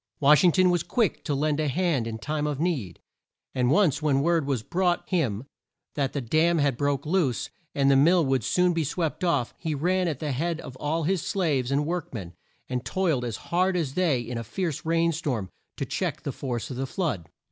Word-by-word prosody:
Wash 150 +4 +6
ing 180 - +6
ton 185 +1 +4
was 175 -2 +2
quick 225 0 0
to 145 - 0
lend 150 +1 0
a 155 - +1
hand 150 -5 0
in 110 -1 -4
time 150 +5 -2
of 145 -2 -2
need, 145 - -2 0.5
and 125 -1 +1
once 150 -2 +3
when 140 -3 +2
word 165 -3 +2
was 130 -6 -1
brought 175 +3 0
him 130 - 0 0.5
that 140 -2 -1
the 140 - -2
dam 160 +8 +2
had 140 -4 +2
broke 140 +1 -1
loose, 155 - 0 0.2
and 140 -1 +4
the - - +5
mill 165 +4 +5
would 135 -3 +1
soon 180 - +2
be 165 -1 0
swept 160 +3 -2
off, 145 -9 +1
he 160 -3 -2
ran 180 +5 +1
at 155 -5 -1
the 150 +1 -3
head 165 +5 -1
of 130 - -9
all 160 +4 -1
his 180 +2 +1
slaves 150 -10 0
and 140 +2 +1
work 170 0 -3
men, 90 -6 -6 0.3
and 125 -1 -3
toiled 165 -9 0
as 115 -4 -3
hard 180 +1 +2
as 150 -6 -2
they 165 -7 +2
in 120 0 -5
a - - -4
fierce 160 - -3
rain 165 0 +3
storm, 130 - -3 0.3
to - - -2
check - - -3
the - - -2
force 125 -2 -4
of 125 - -5
the 135 +1 -2
flood. 120 - -2
150 Hz, 220 wpm, -26 LUFS, 130-170 Hz, 0.5 s, Wash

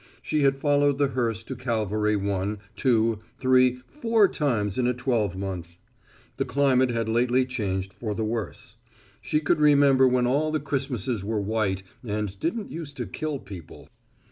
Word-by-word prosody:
She 155 - 0
had 135 -1 +3
followed 145 0 +2
the 140 -1 +2
hearse 115 -4 -1
to 130 - -6
Calvary 110 -3 0
one, 100 +1 -1 0.2
two, 115 -3 +2 0.2
three, 130 -1 +3
four 230 -7 +3
times 115 - -1
in 125 - +2
a 125 - +1
twelvemonth. 95 -8 -2 0.6
The - - +1
climate 130 -2 +3
had 115 -2 -1
lately 125 +3 +2
changed 95 -6 -3
for 105 -2 -4
the 110 - -1
worse. 110 -3 -5 0.4
She 150 - 0
could 155 0 +1
remember 140 -3 +5
when 125 -1 +2
all 145 +5 +1
the 155 - 0
Christmases 135 -6 -2
were 110 +1 -1
white 100 -2 -1 0.2
and 105 -3 -3
didn't 205 - -2
use 155 -3 -6
to 125 -3 -4
kill 155 +2 -4
people. 95 - -11
125 Hz, 160 wpm, -26 LUFS, 105-140 Hz, 0.6 s, remember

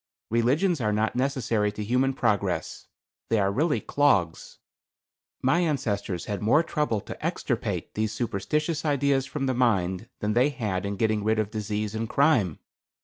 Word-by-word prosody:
Religions 140 +8 +2
are 105 -2 +1
not 110 +2 0
necessary 125 -5 0
to 105 +1 -5
human 125 +5 +2
progress. 105 -6 -1 0.4
They 115 - +2
are 100 -1 +2
really 150 +8 +1
clogs. 100 - +1 0.9
My 135 +7 +3
ancestors 105 - -1
had 105 -1 -4
more 135 +10 +4
trouble 150 -10 -1
to - - -9
extirpate - - -2
these 110 0 -1
superstitious 120 - -1
ideas 140 -2 +1
from 140 -1 -3
the 130 - +1
mind 105 -4 +1
than 105 0 -1
they 125 +5 +4
had 105 -8 -3
in 100 - -3
getting 110 0 0
rid 110 +1 +1
of 110 -1 -1
disease 105 -1 -3
and 110 0 -3
crime. 125 - +3
115 Hz, 155 wpm, -26 LUFS, 105-140 Hz, 0.9 s, more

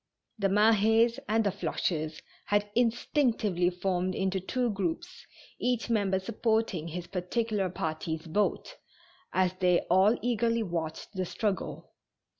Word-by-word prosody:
The 200 - +2
Malics 220 +3 +4
and 225 +1 +3
the 200 - +1
Floches 160 -5 -2 0.2
had 205 0 +1
instinctively 230 - +1
formed 185 0 -1
into 190 0 0
two 245 +5 -1
groups, 200 - -4 0.3
each 245 -1 0
member 200 -4 +2
supporting 220 -4 -1
his 170 +1 -5
particular 195 +2 -1
party's 160 -1 -3
boat, 200 +6 -1 0.5
as 185 -1 +2
they 180 -2 +4
all 195 +5 +5
eagerly 230 -1 +1
watched 165 -1 -4
the 185 -2 -2
struggle. 205 0 -3
200 Hz, 120 wpm, -29 LUFS, 180-225 Hz, 0.5 s, all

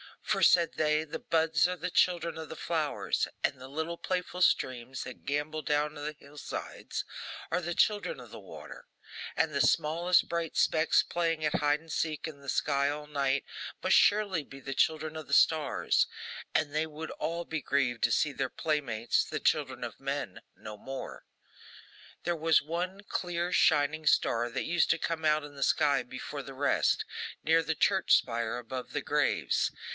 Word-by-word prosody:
For, - - 0
said 170 -2 +5
they, 155 0 +2
the 155 - -6
buds 160 -1 +2
are 180 - -2
the 180 +1 -4
children 170 -2 +2
of 160 -1 -6
the 160 - -8
flowers, 155 -2 -1 0.2
and 130 - 0
the 130 - -9
little 160 +5 -4
playful 180 0 -3
streams 130 -5 +1
that 125 -1 -10
gambol 145 +2 -2
down 150 0 0
the 150 +1 -5
hill 145 0 -16
sides - - -5 0.5
are 180 +2 +1
the 175 0 -3
children 210 - +1
of - - -12
the - - -9
water; - - -11 0.5
and 155 - +1
the 140 - 0
smallest 165 +6 +3
bright 170 -2 -2
specks 160 0 +3
playing 165 -2 -1
at 150 +3 +1
hide 150 0 +2
and 165 0 -12
seek 155 -1 -1
in 150 -3 -9
the 140 -1 -8
sky 140 0 +1
all 150 +1 -5
night, 140 -2 0 0.4
must - - +5
surely 200 -6 +3
be 135 0 -12
the 135 - -4
children 155 +2 +1
of 155 - -7
the 140 - -5
stars; 155 0 +3 0.5
and 150 -2 +1
they 155 +1 0
would 155 +1 -7
all 170 +1 -3
be 160 -2 -4
grieved 130 -4 0
to - - 0
see 150 - +2
their 135 -2 -2
playmates, 125 -8 0
the - - -4
children - - 0
of - - -6
men, - - -4
no 105 -1 -9
more. 135 +5 -7 1.0
There 175 -1 -1
was 160 0 +4
one 180 +5 -3
clear 175 0 -2
shining 155 0 +3
star 120 -4 +3
that 115 - -3
used 175 0 +2
to 160 - +3
come 165 -1 -3
out 155 0 +3
in 145 -1 -10
the 140 - -9
sky 145 -2 +3
before 130 +3 -6
the 135 0 -9
rest, 140 +2 +2 0.4
near 165 +1 +4
the 160 0 -2
church 190 +4 +4
spire, 115 -1 0
above 125 +1 -6
the - - -1
graves. - - +1
155 Hz, 180 wpm, -30 LUFS, 140-165 Hz, 1.0 s, said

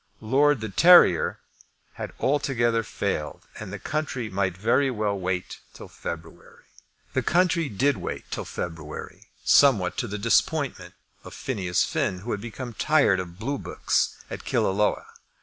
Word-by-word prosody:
Lord 135 +3 +2
de 110 - -4
Terrier 125 - +6 0.6
had - - -6
altogether 130 -5 +1
failed, 95 -8 -4 0.2
and 105 -3 -7
the 105 - -5
country 130 -2 -3
might 95 -2 -1
very 125 +7 +2
well 105 -4 -1
wait 90 -1 -3 0.2
till - - -10
February. 80 -1 -9 0.5
The - - +1
country 170 -3 +2
did 135 +6 +1
wait - - -5
till - - -4
February, 80 -3 -7 0.2
somewhat 110 -11 +4
to - - -1
the 105 - -4
disappointment 100 - 0 0.3
of - - -10
Phineas 95 -9 -1
Finn, 90 -1 -1
who 120 +4 -5
had 105 - -3
become 120 +2 -7
tired 135 -7 +3
of 85 -1 -7
blue 135 +6 -3
books - - -1 0.2
at - - -6
Killaloe. 105 +2 +1
110 Hz, 145 wpm, -25 LUFS, 95-135 Hz, 0.6 s, Terrier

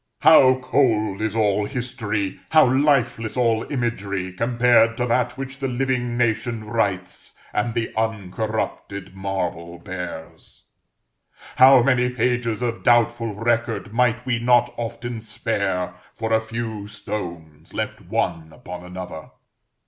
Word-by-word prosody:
How 145 -4 +7
cold 110 -7 +1
is 110 -1 -1
all 105 -2 +2
history 110 -6 -3
how 155 -2 +6
lifeless 130 -4 +1
all 115 -2 +1
imagery, 100 -8 -2
compared 115 +1 +3
to 125 - 0
that 125 +1 0
which 135 0 -6
the 135 - -1
living 125 -1 -1
nation 115 -1 0
writes, 100 -5 -3 0.2
and 115 +3 -1
the 115 -1 -2
uncorrupted 110 -2 -3
marble 90 -3 -4
bears! 90 -3 -8 0.9
how 130 -1 +8
many 125 -1 +3
pages 125 -2 -1
of 115 -1 -2
doubtful 120 -2 +2
record 115 -1 -1
might 120 0 +1
we 125 -3 0
not 120 0 +3
often 115 0 -5
spare, 100 -4 -2 0.2
for 110 0 -2
a 110 - +4
few 110 -2 -5
stones 85 -7 -7
left - - -4
one 80 -1 -2
upon 90 +3 -9
another! 90 -3 -8
115 Hz, 125 wpm, -22 LUFS, 100-120 Hz, 0.9 s, how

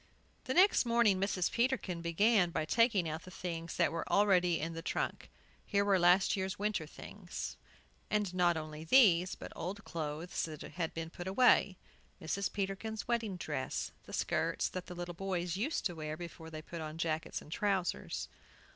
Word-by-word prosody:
The 260 - -2
next 385 +3 +6
morning 235 -5 +3
Mrs. 195 -3 +1
Peterkin 235 -8 0
began 180 +3 +3
by 155 -2 -1
taking 215 -1 +3
out 160 +1 -3
the 185 - -12
things 170 -2 -5
that - - +2
were 165 0 -4
already 180 -4 +4
in 165 +2 -3
the 165 - -5
trunk. - - -3 0.3
Here 200 0 +1
were 195 -2 +4
last 180 +2 +5
year's 190 +1 -2
winter 205 -6 -1
things, 180 +3 -7 0.5
and 210 -4 0
not 175 -2 +3
only 155 0 -6
these, 185 -3 +5
but - - -9
old 200 +5 -5
clothes 160 +1 -4
that 155 -2 -8
had 165 +1 -4
been 165 0 -4
put 175 +2 -7
away, 195 -2 +4 0.4
Mrs. 195 +4 -2
Peterkin's 205 +2 -3
wedding 230 -5 -1
dress; 150 -6 -3
the - - -11
skirts - - 0
the 180 -1 -6
little 175 0 -5
boys 180 -1 -2
used 255 - -1
to 175 - 0
wear 155 -1 -5
before 170 -2 -8
they 155 -1 -7
put 170 0 -7
on 155 0 -6
jackets 160 -1 -2
and 150 - -14
trousers. 195 -3 -1
180 Hz, 175 wpm, -33 LUFS, 165-200 Hz, 0.5 s, next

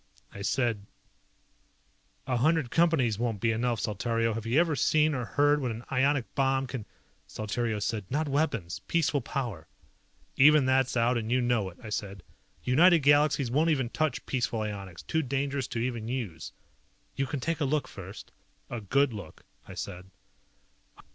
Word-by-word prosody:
I 100 - -8
said, 110 -2 0 1.4
"A 130 -2 0
hundred 155 0 +2
Companies 150 -11 +2
won't 115 -4 -1
be 115 +3 +2
enough. 115 0 0
Saltario, 115 +2 0
have 115 0 -5
you 125 +7 +3
ever 165 -3 +2
seen 155 +4 +3
or 125 -3 -2
heard 145 +6 +2
what 125 - -1
an 115 +1 -5
ionic 135 -1 +2
bomb 135 -1 +1
can 125 -4 -6 0.2
..." - - -39
Saltario 110 +1 -2
said, 105 0 -2
"Not 150 +3 0
weapons, 135 - -1
peaceful 155 -4 +1
power." 115 - -4 0.7
"Even 150 0 +7
that's 130 -1 +2
out 120 +1 +2
and 110 +1 -4
you 130 - +3
know 120 -5 +1
it," 90 - -16
I 110 - -7
said. 100 -4 -4 0.4
"United 165 +6 +5
Galaxies 145 -3 +4
won't 155 +5 +3
even 135 -6 +1
touch 155 -5 -1
peaceful 120 -3 -1
ionics, 100 -4 -6
too 160 - 0
dangerous 140 -1 -2
to 120 - -5
even 115 -2 -2
use." 115 -11 -4 0.6
"You 135 - -1
can 145 - -3
take 165 +4 -2
a - - +3
look 145 +2 0
first." 95 -1 -10 0.4
"A 120 -2 -4
good 140 +5 +2
look," 100 -7 -10 0.2
I - - -9
said. 95 -1 -7
125 Hz, 165 wpm, -29 LUFS, 110-145 Hz, 1.4 s, Even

